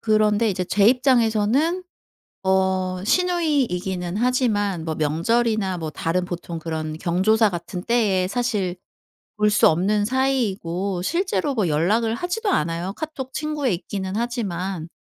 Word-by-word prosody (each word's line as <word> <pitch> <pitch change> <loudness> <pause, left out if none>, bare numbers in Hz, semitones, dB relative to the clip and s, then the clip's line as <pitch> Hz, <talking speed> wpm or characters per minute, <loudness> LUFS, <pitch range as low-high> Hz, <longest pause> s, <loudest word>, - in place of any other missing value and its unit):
그런데 215 0 +2
이제 185 -1 -2
제 200 +2 +2
입장에서는 250 - +2 0.6
어 190 -1 +1
시누이이기는 230 - 0
하지만 215 -8 +1
뭐 160 - -2
명절이나 190 +6 0
뭐 160 -2 -4
다른 170 +4 -1
보통 175 -1 -6
그런 155 -1 -4
경조사 210 +5 +3
같은 175 +1 -5
때에 195 -5 +1
사실 205 -6 -1 0.6
볼 210 0 +3
수 210 - +4
없는 200 +6 +1
사이이고 200 -8 -1
실제로 340 - 0
뭐 215 -7 +1
연락을 210 +10 +1
하지도 360 - -2
않아요 170 - -1
카톡 280 -5 -6
친구에 300 -5 -1
있기는 190 +1 -5
하지만. 195 -8 -3
205 Hz, 295 characters per minute, -22 LUFS, 180-245 Hz, 0.6 s, 수